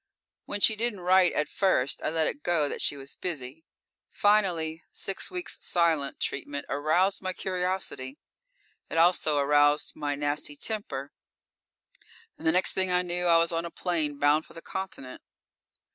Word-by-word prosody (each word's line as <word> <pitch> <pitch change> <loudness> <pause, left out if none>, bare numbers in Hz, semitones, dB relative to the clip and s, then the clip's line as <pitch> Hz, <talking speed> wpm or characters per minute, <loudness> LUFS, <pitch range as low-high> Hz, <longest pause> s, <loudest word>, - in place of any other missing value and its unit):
When 205 - -4
she 220 - +5
didn't 220 -3 -1
write 180 0 +4
at 150 - 0
first, 185 -9 +1
I - - -1
let 160 0 +1
it 290 - -3
go 165 - +2
that - - -4
she 145 - +1
was 135 0 -7
busy. 155 -3 -5 0.5
Finally, 175 -6 +1
six 195 - -3
weeks' 360 -1 -5
silent 165 -5 +1
treatment 140 +1 -3
aroused 155 +7 +1
my 185 -1 -3
curiosity. 180 -8 -3 0.7
It - - -3
also 165 -3 +3
aroused 145 +1 +3
my 145 -1 -2
nasty 145 +1 -2
temper, 145 -7 -4 1.2
and - - -5
the - - +6
next 180 +3 +3
thing 190 -1 0
I 180 0 +2
knew 175 0 -1
I 170 -1 +6
was 165 0 +3
on 165 0 -1
a 170 - -5
plane 160 -5 -2
bound 145 +2 +3
for - - -16
the 165 - -10
Continent. 190 -9 -6
165 Hz, 160 wpm, -28 LUFS, 145-185 Hz, 1.2 s, the